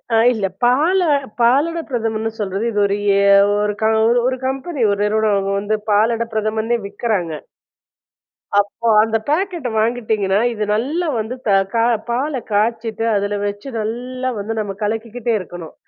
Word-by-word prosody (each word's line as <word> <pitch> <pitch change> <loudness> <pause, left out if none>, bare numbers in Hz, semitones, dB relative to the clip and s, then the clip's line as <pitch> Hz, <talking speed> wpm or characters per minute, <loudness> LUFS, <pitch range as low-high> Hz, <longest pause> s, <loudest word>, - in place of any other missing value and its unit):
ஆ, - - +5 0.2
இல்ல. 215 -4 -2 0.2
பால 300 +10 +3 0.4
பாலடைபிரதமன்னு 240 -5 +1
சொல்றது. 195 0 -2
இது 210 - -1
ஒரு 200 0 0 0.2
ஏ - - +3 0.4
ஒரு 210 - -1
க - - +2
ஒரு - - +2
ஒரு 240 +1 +3
ஒரு 260 0 -1
கம்பெனி 270 +2 -3
ஒரு 200 - -1
நிறுவனம் 215 0 +1
அவுங்க 195 0 -1
வந்து 210 +2 -1
பாலடைபிரதமன்னே 220 +1 +1
விற்கறாங்க. 200 -4 -2 1.3
அப்போ, 205 +3 -2 0.2
அந்த 225 0 +1
பேக்கெட்டு 340 -4 -1
வாங்கிட்டீங்கன்னா. 215 -4 0
இது 215 -1 -3
நல்லா 295 +11 -1
வந்து 220 +3 -4
த - - +3 0.2
க - - -4 0.3
பால 265 +3 -1
காய்ச்சிட்டு, 225 +1 0
அதில 205 0 -1
வச்சு 205 +5 -6
நல்ல 250 +4 -3
வந்து 210 +3 -3
நம்ம 205 -2 -2
கலக்கிக்கிட்டே 225 +2 -2
இருக்கணும். 175 -3 -9
225 Hz, 145 wpm, -19 LUFS, 210-245 Hz, 1.3 s, ஆ